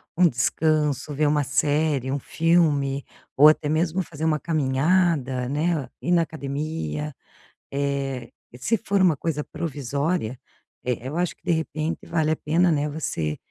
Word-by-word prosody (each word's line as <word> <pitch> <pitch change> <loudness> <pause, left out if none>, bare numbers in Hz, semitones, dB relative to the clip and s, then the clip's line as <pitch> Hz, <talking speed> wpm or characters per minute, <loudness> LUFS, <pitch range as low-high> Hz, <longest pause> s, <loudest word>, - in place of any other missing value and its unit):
um 180 0 +5
descanso, 150 +2 +1
ver 150 +2 +2
uma 145 0 +2
série, 145 -2 +1
um 140 - -1
filme 145 -5 +2 0.3
ou 150 +3 +9
até 155 -1 +1
mesmo 165 +4 +1
fazer 160 -1 -5
uma 155 -1 +2
caminhada, 140 -3 +1
né, 150 -2 0
ir 175 - -2
na 175 - +5
academia 140 - -4 0.6
eh, 140 -2 -2 0.3
se 225 - +1
for 200 0 +1
uma 175 -5 +4
coisa 150 0 -2
provisória, 145 -3 -2 0.5
eh, 125 0 -2
eu 150 - -5
acho 175 0 0
que, - - -42
de 175 - -1
repente, 160 -1 -2
vale 160 -2 +1
a 155 - +2
pena, 170 +4 +2
né, 150 -2 +1
você 80 - -2
150 Hz, 150 wpm, -24 LUFS, 135-165 Hz, 0.6 s, ou